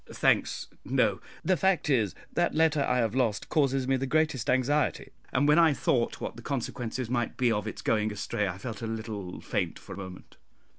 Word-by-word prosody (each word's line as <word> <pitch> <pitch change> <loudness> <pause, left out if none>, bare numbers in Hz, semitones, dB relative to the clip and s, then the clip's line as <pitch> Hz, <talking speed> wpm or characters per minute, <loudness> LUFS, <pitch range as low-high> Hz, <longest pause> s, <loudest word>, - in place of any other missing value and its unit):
"Thanks, - - +1 0.2
no; - - +1 0.2
the 185 - +4
fact 190 -2 +2
is, 115 -9 +2 0.2
that 175 - +1
letter 160 -2 +3
I 125 -2 +1
have 115 -3 +1
lost 120 -5 0
causes 135 -3 +2
me 135 0 +3
the 135 +1 -2
greatest 155 -4 +1
anxiety, 135 +3 +1 0.2
and 145 +3 +2
when 150 +3 +6
I 165 -3 +6
thought 120 -3 0
what - - -5
the 120 - -10
consequences 125 -2 -3
might 120 -1 -1
be 125 -2 +3
of 105 -2 -1
its - - -6
going 110 -1 +1
astray 105 0 -2
I 90 -1 -4
felt 110 0 -6
a 115 - -3
little 110 -5 -5
faint - - -2
for - - -10
a - - -9
moment." 95 -2 -9
125 Hz, 200 wpm, -28 LUFS, 110-145 Hz, 0.2 s, when